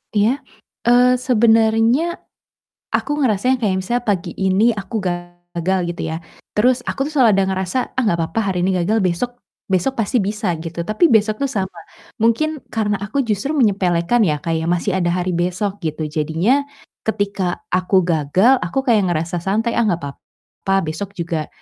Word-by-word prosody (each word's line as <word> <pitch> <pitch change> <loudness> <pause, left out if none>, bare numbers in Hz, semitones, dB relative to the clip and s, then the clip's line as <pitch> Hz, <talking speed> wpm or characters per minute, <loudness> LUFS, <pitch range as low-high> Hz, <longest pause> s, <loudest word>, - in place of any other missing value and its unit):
Iya? 225 +7 +2 0.5
Eee, 250 +1 +5
sebenarnya 225 +2 +3 0.9
aku - - -1
ngerasanya 250 +3 +2
kayak 195 -3 +2
misalnya 240 +6 -1
pagi 200 -6 -1
ini 190 +2 +1
aku 200 +2 -6
gagal 175 +1 -3
gitu 170 - -4
ya, 160 - -2 0.4
terus 245 +3 +3
aku - - -4
tuh - - -6
selalu 250 -5 +5
ada - - +3
ngerasa, 190 +4 -2 0.2
“Ah, 260 - +1
nggak 170 -6 +1
papa 165 - -2
hari 180 - -2
ini 190 - +1
gagal, 215 +5 +1
besok 185 +6 0 0.4
besok 190 +8 +1
pasti 230 +3 +1
bisa.” 205 -1 -1
Gitu. 165 +1 -5
Tapi 215 - +3
besok 215 -4 +2
tuh 280 - +1
sama. 190 -8 -4 0.4
Mungkin 285 +8 +1
karena 210 -3 -1
aku 215 +8 -1
justru 230 +7 -1
menyepelekan 195 - +2
ya, 150 -2 -1
kayak 165 0 -1
masih 175 +3 0
ada 175 -1 +1
hari 180 0 -1
besok 185 +4 -1
gitu. 155 -2 -3
Jadinya 170 - +1 0.4
ketika 200 -4 -1
aku 185 +1 +3
gagal 180 - +3
aku 175 +11 -2
kayak 220 -7 +3
ngerasa 170 +1 -2
santai, 220 +7 0
“Ah, 225 - +2
nggak 175 -3 0
papa, 145 +6 -7
besok 185 +6 -5
juga 165 -3 -3
200 Hz, 165 wpm, -19 LUFS, 175-230 Hz, 0.9 s, Eee